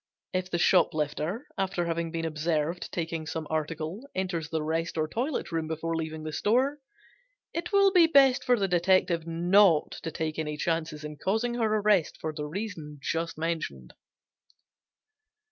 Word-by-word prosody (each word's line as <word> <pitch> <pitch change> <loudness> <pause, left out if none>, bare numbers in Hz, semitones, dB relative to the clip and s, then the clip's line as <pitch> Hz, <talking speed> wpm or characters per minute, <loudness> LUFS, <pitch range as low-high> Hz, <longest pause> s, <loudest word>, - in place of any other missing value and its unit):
If 185 0 -1
the 175 - 0
shoplifter, 160 - +1
after 190 -2 0
having 170 0 -1
been 165 0 -3
observed 160 +1 -1
taking 165 -2 -3
some 160 0 -4
article, 160 - -3
enters 175 -4 -2
the 160 -1 -1
rest 165 +2 -2
or 155 -1 +1
toilet 255 - -2
room 165 -1 -1
before 160 +1 -2
leaving 160 -1 -4
the 155 0 -5
store, 255 - +1 0.7
it 335 +3 -3
will 395 -1 +5
be 355 -3 +6
best 275 -5 +5
for 250 -1 +3
the 195 -2 +1
detective 180 -2 +2
not 175 0 +4
to - - -4
take 160 -1 -3
any 150 -1 -3
chances 160 -1 -2
in 150 0 -7
causing 220 +8 0
her 230 -3 0
arrest 205 -5 +2
for 155 -1 -3
the 150 -1 -4
reason 160 -4 -6
just 165 +3 -2
mentioned. 155 - -3
165 Hz, 160 wpm, -28 LUFS, 155-195 Hz, 0.7 s, be